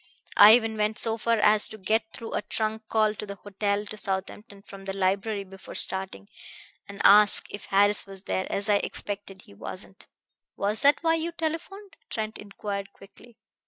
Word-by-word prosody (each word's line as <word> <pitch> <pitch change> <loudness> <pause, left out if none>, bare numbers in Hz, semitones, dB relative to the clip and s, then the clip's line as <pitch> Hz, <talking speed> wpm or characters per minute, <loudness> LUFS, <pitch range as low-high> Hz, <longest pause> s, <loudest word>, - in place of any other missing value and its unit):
I 215 +2 +9
even 225 -2 -1
went 215 +1 0
so 225 -2 +3
far 230 +1 +1
as 210 0 +5
to 215 - -10
get 220 +3 -1
through 225 - -8
a - - -1
trunk 220 +1 -4
call 215 -1 +2
to 210 - -7
the 200 - -6
hotel 200 +1 -2
at 210 0 -8
Southampton 195 +1 -5
from 195 -1 -12
the 195 0 -5
library 195 +2 -1
before 195 0 -12
starting, 190 - -1 0.6
and 200 0 -10
ask 210 0 +7
if 205 - -7
Harris 205 +1 +3
was 195 -1 -5
there. 185 - -2
As 200 +1 0
I 205 -1 +4
expected, 200 -1 -5
he - - -17
wasn't." 100 - -9 0.5
"Was 205 +2 0
that 285 +3 +4
why 325 0 +3
you 330 +1 -2
telephoned?" 335 +5 -6
Trent 220 0 -4
inquired 200 -1 -6
quickly. 215 +4 -17
210 Hz, 180 wpm, -26 LUFS, 195-220 Hz, 0.6 s, I